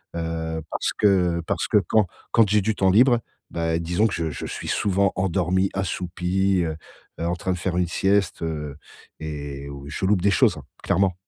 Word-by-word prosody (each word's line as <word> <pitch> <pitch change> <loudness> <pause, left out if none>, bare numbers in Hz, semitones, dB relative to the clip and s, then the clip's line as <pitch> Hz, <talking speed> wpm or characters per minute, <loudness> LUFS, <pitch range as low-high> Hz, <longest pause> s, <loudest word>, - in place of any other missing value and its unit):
heu, 80 -1 -3
parce - - -1
que 90 -5 +2
parce - - -1
que, - - +3
quand 110 -3 +4 0.3
quand 115 -3 +5
j'ai 105 +1 +3
du 110 +2 0
temps 95 -2 +3
libre, 120 +3 +5 0.3
bah, 80 0 -1
disons 90 +6 +1
que 95 - -4
je 80 -1 -2
je - - -6
suis - - -6
souvent 100 -1 +1
endormi, 95 +1 +1
assoupi, 95 0 0
heu, 80 -1 -3 0.4
heu, 85 - -2
en 85 +1 0
train 95 +1 -2
de - - -4
faire 90 0 -2
une 90 -1 +2
sieste, 95 +1 +1
heu, 75 -3 -4 0.4
et 70 -2 -6
ou 70 0 -9
je 95 - -3
loupe 95 -2 +3
des 100 +1 +3
choses, - - +3
hein, - - -9 0.2
clairement! 95 -2 +2
90 Hz, 195 wpm, -24 LUFS, 80-100 Hz, 0.4 s, quand